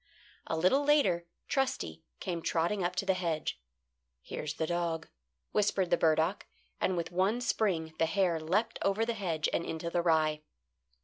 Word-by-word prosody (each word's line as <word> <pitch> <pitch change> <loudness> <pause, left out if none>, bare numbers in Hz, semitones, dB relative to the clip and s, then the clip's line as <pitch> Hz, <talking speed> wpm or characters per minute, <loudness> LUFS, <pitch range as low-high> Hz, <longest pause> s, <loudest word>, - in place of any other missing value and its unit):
A 160 - -1
little 185 - +3
later 280 - +3 0.2
Trusty 170 - -1 0.2
came 175 -3 -3
trotting 175 +5 0
up 175 +1 -1
to 195 - -1
the 190 - +3
hedge. 165 - -2 0.6
"Here's 150 0 -4
the 160 - -1
dog," 170 -1 -1 0.4
whispered 195 -3 +1
the - - +7
burdock, 160 +4 +2 0.3
and 185 - +1
with 170 - -2
one 190 +6 +2
spring 185 -9 0
the 165 - +3
hare 170 -1 +2
leapt 205 +9 0
over 200 +3 +2
the 235 - -1
hedge 170 -8 -1
and - - +1
into 170 +1 -4
the 175 - +2
rye. 155 -2 +2
175 Hz, 165 wpm, -31 LUFS, 160-195 Hz, 0.6 s, the